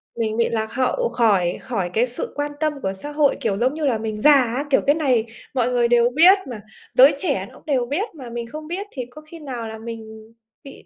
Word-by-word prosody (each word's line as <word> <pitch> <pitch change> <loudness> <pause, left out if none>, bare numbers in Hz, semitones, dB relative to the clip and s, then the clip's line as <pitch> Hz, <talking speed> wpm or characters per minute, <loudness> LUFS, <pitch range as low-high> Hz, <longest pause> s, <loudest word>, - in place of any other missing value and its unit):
Mình 220 -1 -2
bị 235 - +2
lạc 220 0 -3
hậu 255 -2 0
khỏi 210 -7 +2
khỏi 195 -8 -3
cái 235 +3 +3
sự 245 - -6
quan 290 0 -2
tâm 310 -1 +1
của 190 - -2
xã 290 +10 -8
hội, 295 -1 +2
kiểu, 205 -5 0
giống 255 +5 +1
như 310 -1 -3
là, 245 -5 +2
mình 215 -1 -5
già 300 - +7
á, 260 +1 +2
kiểu, 270 - +3
cái 285 +2 +4
này 255 -8 +1 0.3
mọi 250 -2 +1
người 240 -1 +2
đều 240 0 +4
biết 345 +9 +6
mà, 235 -5 -7 0.3
giới 270 +4 +7
trẻ 280 - -1
nó - - -16
đều 260 -5 +1
biết 335 - -2
mà 255 -5 -9
mình 235 0 -5
không 305 +4 -8
biết 390 +5 -4
thì 255 -3 -5
có 305 +4 -12
khi 320 +2 -13
nào 250 -6 -6
là 220 - -7
mình 220 -1 -10 0.3
bị 275 - -13
245 Hz, 245 wpm, -22 LUFS, 225-290 Hz, 0.3 s, già